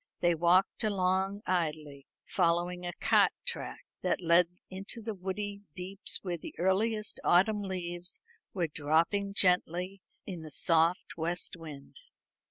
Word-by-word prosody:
They 175 -1 +3
walked 175 +6 +3
along 195 0 +1
idly, 155 -6 -2 0.2
following 175 +1 +1
a 175 - -3
cart - - +4
track 485 - -4 0.2
that - - +1
led 170 0 +5 0.2
into 195 +5 -7
the 225 0 -4
woody 200 +2 -4
deeps 190 +2 -2
where 175 -3 -3
the - - -9
earliest 210 +4 +1
autumn 205 +4 +4
leaves 180 -2 -3 0.3
were 180 -4 0
dropping 165 +7 +1
gently 180 0 +2 0.2
in 180 -5 -6
the 155 - -8
soft 165 +4 +2
west 170 +3 -1
wind. 155 -4 -10
180 Hz, 130 wpm, -31 LUFS, 170-195 Hz, 0.3 s, led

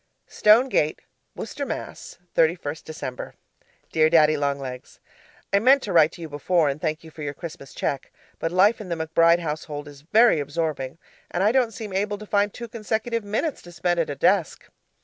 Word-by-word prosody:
'STONE 220 +5 +4
GATE', 155 - 0 0.3
WORCESTER, - - -5
MASS., - - -6 0.2
31st 160 -2 +1
December 140 -5 -7 0.6
Dear 155 0 +4
Daddy 155 -2 +5
Long 140 -1 0
Legs, 130 -2 -8 0.5
I 200 - +5
meant 260 +5 +5
to 200 - -3
write 160 -2 +6
to 175 - -11
you 165 - -5
before 155 +2 +1
and 140 +2 -4
thank 155 -1 -2
you 160 - -12
for 155 - -11
your 145 -1 -4
Christmas 165 -5 -9
cheque, 140 -2 -3 0.3
but 165 - -2
life 200 +5 +4
in 195 - -8
the 170 - -1
McBride 165 +1 +3
household 150 -3 -5
is 145 -1 -12
very 215 +4 +4
absorbing, 145 -2 -3 0.3
and 180 - -1
I 210 - +4
don't 250 -2 +3
seem 210 -2 -7
able 205 +2 -1
to 215 - -10
find 205 0 +1
two 235 +3 -8
consecutive 225 0 -2
minutes 220 +10 -2
to 175 - -13
spend 175 +1 0
at 165 - 0
a 145 - -3
desk. 185 +1 +1
165 Hz, 190 wpm, -24 LUFS, 150-205 Hz, 0.6 s, write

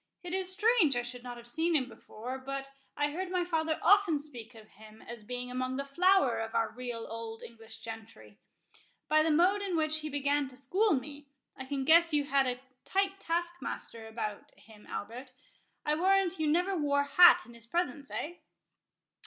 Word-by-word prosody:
It 355 0 -6
is 375 -1 -1
strange 410 - +3
I 245 - 0
should 245 0 -5
not 245 -1 -8
have 235 - -12
seen 320 +6 0
him 260 -4 +2
before;—but 265 +4 -7 0.3
I 290 0 +1
heard 365 +4 -4
my 360 -1 0
father 320 -2 0
often 395 -3 +5
speak 250 -6 -9
of 215 -1 -14
him 215 +1 -16
as 235 -2 -9
being 250 +2 -5
among 255 +1 -2
the 275 +1 -3
flower 345 -2 +3
of 225 0 -5
our 225 -1 +1
real 240 -2 -5
old 225 0 -7
English 225 -1 -11
gentry. 220 - -10 0.7
By 310 0 +4
the 320 - +2
mode 360 +6 +4
in 380 -4 -1
which 310 0 +2
he 310 0 -4
began 285 0 0
to 255 -1 -12
school 375 - +2
me, 285 +2 -7 0.3
I 265 - -7
can 270 0 -3
guess 335 +1 +5
you 290 - +3
had 275 -1 +2
a 250 0 -2 0.2
tight 390 0 0
taskmaster 340 - -4
of 220 +1 -14 0.4
him, 215 -2 -17
Albert—I 255 +6 -7
warrant 375 +2 +2
you 310 - +1
never 355 +5 +2
wore 285 -3 +2
hat 350 +5 +7
in 235 - -14
his 230 0 -11
presence, 290 -3 -2
eh?" 345 +4 -5
280 Hz, 185 wpm, -31 LUFS, 240-340 Hz, 0.7 s, hat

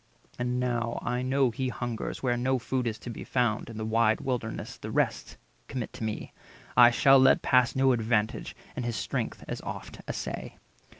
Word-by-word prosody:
230 120 0 0
And 125 0 0
now 120 -2 -1
I 125 0 -1
know 130 0 +2
he 130 +3 -2
hungers, 120 0 -4
where 125 -2 +2
no 130 +2 +1
food 125 0 -1
Is 110 -1 -2
to 120 - -7
be - - -7
found, 120 -4 0
in 115 - -8
the 110 - -3
wide 110 0 +3
Wilderness: 120 -4 -3
The - - -7
rest - - -1 0.3
commit 125 -4 -4
to - - -7
me; 110 -1 -4 0.4
I 120 -1 +9
shall 135 +3 +6
let 130 0 +5
pass 125 -2 +4
No 135 0 +4
advantage, 110 -2 0 0.2
and 125 - -3
his 120 -1 -2
strength - - -3
as - - -4
oft - - -7
assay." - - -5
120 Hz, 190 wpm, -28 LUFS, 115-130 Hz, 0.4 s, I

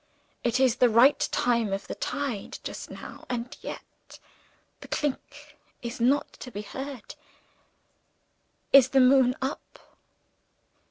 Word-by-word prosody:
It 240 +1 +1
is 260 -3 +3
the 250 - +5
right 240 +6 +5
time 235 -4 +1
of 195 0 -3
the - - -5
tide, 270 -8 -4
just - - -7
now - - -10
and 245 -1 -4
yet, - - -10 0.6
'the - - -11
clink' 290 +1 -4 0.3
is 235 0 -5
not 265 +5 +2
to 250 - -8
be 210 -3 -6
heard. 265 +2 -7 1.6
Is 270 -2 +8
the 270 - +3
moon 255 -1 +5
up?" 270 +2 -5
255 Hz, 125 wpm, -27 LUFS, 235-275 Hz, 1.6 s, Is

